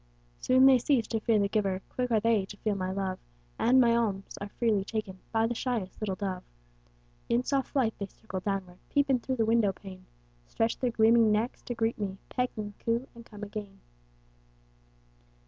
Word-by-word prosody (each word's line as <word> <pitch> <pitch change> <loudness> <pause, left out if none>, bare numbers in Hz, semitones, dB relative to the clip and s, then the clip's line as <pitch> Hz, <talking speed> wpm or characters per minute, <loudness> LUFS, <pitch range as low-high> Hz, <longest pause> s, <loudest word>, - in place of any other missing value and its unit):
Soon 260 +1 +5
they 265 -2 +7
cease 245 -2 +2
to 225 - 0
fear 220 0 +2
the 200 -1 +2
giver, 195 -3 -1
Quick 250 -1 -2
are 225 -2 +3
they 225 -2 +2
to 205 - -11
feel 215 +1 -1
my 185 -1 -2
love, 190 -1 -2 0.4
And 255 +2 +5
my 235 -2 +5
alms 200 -4 -1
are 205 - -5
freely 215 -3 +1
taken 200 -3 -4
By 225 0 +2
the 235 - 0
shyest 230 -6 -3
little 200 -3 -1
dove. 185 -2 -3 0.9
In 240 +1 +2
soft 270 0 0
flight, 245 -6 +1
they 200 - -3
circle 195 -2 -7
downward, 185 -2 -3
Peep 285 -1 +2
in 255 - +3
through 260 +2 -2
the 225 -3 +1
window 225 -2 +3
pane; 190 -1 -12 0.4
Stretch 225 - -1
their 250 - +1
gleaming 225 -1 +5
necks 220 +4 0
to 245 - -5
greet 225 0 0
me, 195 -2 -3
Peck 250 -1 0
and 205 -1 -4
coo, 235 +3 -1
and 235 -1 -12
come 210 -1 -10
again. 205 -1 -7
220 Hz, 195 wpm, -29 LUFS, 195-235 Hz, 0.9 s, they